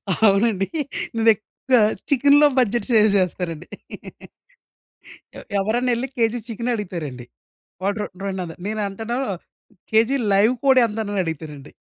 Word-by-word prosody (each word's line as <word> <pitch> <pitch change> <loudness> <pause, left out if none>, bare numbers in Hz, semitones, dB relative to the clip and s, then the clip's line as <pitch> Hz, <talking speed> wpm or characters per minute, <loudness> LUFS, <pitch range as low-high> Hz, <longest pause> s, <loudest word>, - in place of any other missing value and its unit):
అవునండి. 200 -1 +2 0.5
నేనెక్కువగా 225 +2 +2 0.3
చికెన్‍లో 285 +2 +5
బడ్జెట్ 240 -1 0
సేవ్ 215 -2 +5
జేస్తానండి. 180 -3 -2 1.7
ఎవ్ - - -12
ఎవరైనా 240 +5 0
ఎళ్లి 245 +3 -3
కేజీ 230 0 +1
చికెన్ 235 +1 -3
అడుగుతారండి. 160 - -6 0.6
వాడు 200 +2 -1
రోన్ 210 - -5
రొండు 190 -1 -3
వందల్ 165 -1 -9
నేను 215 0 -2
అంటాను 225 +5 -4 0.7
"కేజీ 225 +5 +3 0.2
లైవ్ 210 +5 +4
కోడి 265 -2 +5
ఎంత?" 220 -1 -5
అని 205 -1 -2
అడుగుతానండి. 150 -3 -7
215 Hz, 120 wpm, -22 LUFS, 190-235 Hz, 1.7 s, చికెన్‍లో